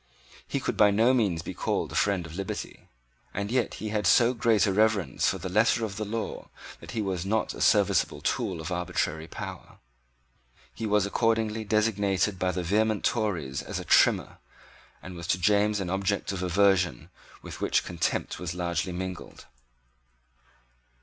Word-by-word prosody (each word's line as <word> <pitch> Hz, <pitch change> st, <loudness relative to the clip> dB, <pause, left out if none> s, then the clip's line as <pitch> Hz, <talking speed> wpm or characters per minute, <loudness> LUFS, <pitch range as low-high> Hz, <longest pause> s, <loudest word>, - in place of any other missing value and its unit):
He -, -, -2 dB
could -, -, -3 dB
by 105 Hz, -, +6 dB
no 115 Hz, +5 st, +3 dB
means 100 Hz, -10 st, +1 dB
be -, -, -6 dB
called -, -, -2 dB
a -, -, -8 dB
friend 100 Hz, -4 st, +1 dB
of 80 Hz, -, -10 dB
liberty; 100 Hz, 0 st, -6 dB, 0.5 s
and 100 Hz, +2 st, -3 dB
yet 125 Hz, -1 st, 0 dB
he 110 Hz, -, -5 dB
had 105 Hz, -2 st, 0 dB
so 120 Hz, +6 st, +5 dB
great 115 Hz, -3 st, +3 dB
a 100 Hz, -, +1 dB
reverence 105 Hz, -, +2 dB
for 95 Hz, -, +1 dB
the 95 Hz, +1 st, -6 dB
letter 110 Hz, +4 st, +2 dB
of 100 Hz, -2 st, -7 dB
the 110 Hz, -, -3 dB
law 110 Hz, +2 st, -5 dB, 0.3 s
that -, -, -12 dB
he 110 Hz, -, 0 dB
was 95 Hz, -3 st, -2 dB
not 105 Hz, +2 st, -1 dB
a -, -, -8 dB
serviceable -, -, +3 dB
tool 90 Hz, -3 st, -2 dB
of 80 Hz, -, -6 dB
arbitrary 80 Hz, -3 st, -2 dB
power. -, -, -8 dB, 1.0 s
He 110 Hz, -, -4 dB
was 105 Hz, -1 st, +2 dB
accordingly 110 Hz, +1 st, 0 dB
designated 105 Hz, -2 st, +1 dB
by 95 Hz, 0 st, +1 dB
the 90 Hz, 0 st, -3 dB
vehement 105 Hz, +4 st, +1 dB
Tories 85 Hz, -, -1 dB
as -, -, -5 dB
a -, -, -7 dB
Trimmer, -, -, +3 dB, 0.6 s
and 90 Hz, -, -8 dB
was 85 Hz, -1 st, -8 dB
to 85 Hz, -, +2 dB
James 105 Hz, +3 st, +2 dB
an 90 Hz, -2 st, -3 dB
object 100 Hz, +1 st, -1 dB
of 95 Hz, -2 st, -4 dB
aversion 90 Hz, -5 st, +2 dB, 0.3 s
with -, -, -9 dB
which -, -, +1 dB
contempt 85 Hz, -1 st, -2 dB
was 90 Hz, -1 st, -4 dB
largely 85 Hz, 0 st, -2 dB
mingled. 95 Hz, 0 st, -7 dB
100 Hz, 170 wpm, -27 LUFS, 90-110 Hz, 1.0 s, by